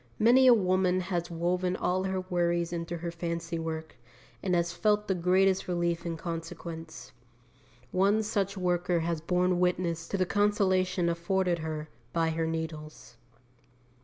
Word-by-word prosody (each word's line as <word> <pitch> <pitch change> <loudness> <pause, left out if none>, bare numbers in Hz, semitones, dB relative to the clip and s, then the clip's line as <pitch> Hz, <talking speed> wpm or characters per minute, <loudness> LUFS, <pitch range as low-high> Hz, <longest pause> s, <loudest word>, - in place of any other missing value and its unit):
Many 250 +4 +6
a 250 - +9
woman 185 -2 +2
has 175 -2 -2
woven 180 +2 0
all 185 +1 0
her 190 -1 -1
worries 175 -1 0
into 170 0 -3
her 170 +1 -4
fancy 170 0 -4
work, 160 -3 -5 0.4
and 185 -2 0
has 170 0 0
felt 210 +4 +1
the 190 - +2
greatest 185 +2 +2
relief 175 -1 -1
in 165 -1 -3
consequence. 165 -1 -7 0.8
One 200 +4 +3
such 200 -2 -1
worker 180 -1 +1
has 165 -1 -2
borne 180 +2 +1
witness 175 -2 0
to 195 - -2
the 185 - +2
consolation 185 -3 +2
afforded 170 +1 0
her 155 -1 -4 0.3
by 165 -1 +1
her 160 0 -1
needles. 155 -6 -6
175 Hz, 145 wpm, -29 LUFS, 165-185 Hz, 0.8 s, a